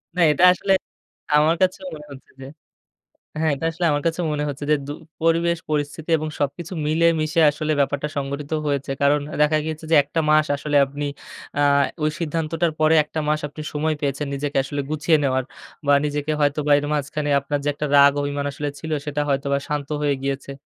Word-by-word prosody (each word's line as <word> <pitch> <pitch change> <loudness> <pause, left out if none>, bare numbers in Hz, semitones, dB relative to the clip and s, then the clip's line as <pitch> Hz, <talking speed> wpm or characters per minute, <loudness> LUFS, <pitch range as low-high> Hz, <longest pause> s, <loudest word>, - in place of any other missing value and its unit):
না, 180 - +1
এটা 160 +5 +1
আসলে 195 +2 0 0.6
আমার 155 +2 +4
কাছেও 185 0 +1
মনে 150 -1 -11
হচ্ছে 135 -1 -13
যে - - -7 1.0
হ্যাঁ। 160 -1 +2
এটা 150 +4 -5
আসলে 175 +2 -2
আমার 145 0 0
কাছেও 165 +1 -1
মনে 150 0 -2
হচ্ছে 145 +1 -6
যে, - - +6
দু - - -4 0.3
পরিবেশ, 170 +1 +2
পরিস্থিতি 150 +2 -3
এবং 155 0 -4
সবকিছু 150 +5 -3
মিলেমিশে 165 +1 +2
আসলে 155 +1 -3
ব্যাপারটা 140 +1 0
সংগঠিত 140 +1 -4 0.2
হয়েছে। 140 -1 -1
কারণ 140 +1 +4 0.2
দেখা 150 +1 +4
গিয়েছে 160 0 -5
যে - - +6
১ 140 - -12
টা - - +3
মাস 155 0 +5
আসলে 145 0 0
আপনি, 145 +2 -5 0.5
আ - - +3 0.4
ওই 155 - +2
সিদ্ধান্তটার 165 +1 -1
পরে 155 +1 +4
১ 150 - -23
টা - - +1
মাস 155 0 +1
আপনি 145 +1 -9
সময় 155 +1 0
পেয়েছেন, 140 0 -2
নিজেকে 145 0 -3
আসলে 145 +1 -3
গুছিয়ে 155 +1 +2
নেওয়ার 130 -1 +1 0.4
বা 145 - +5
নিজেকে 145 +1 -2
হয়তো 145 +1 +2
বা 145 - +3
এর 145 - -4
মাঝখানে 145 +1 -2
আপনার 145 +1 -2
যে - - -3
একটা 150 +1 -3
রাগ, 140 0 +8
অভিমান 145 0 -2
আসলে 145 +1 -4
ছিল, 160 +1 -6
সেটা 150 0 -2
হয়তোবা 140 0 0
শান্ত 145 -2 -3
হয়ে 145 -1 +2
গিয়েছে। 140 0 -3
150 Hz, 195 wpm, -22 LUFS, 145-155 Hz, 1.0 s, রাগ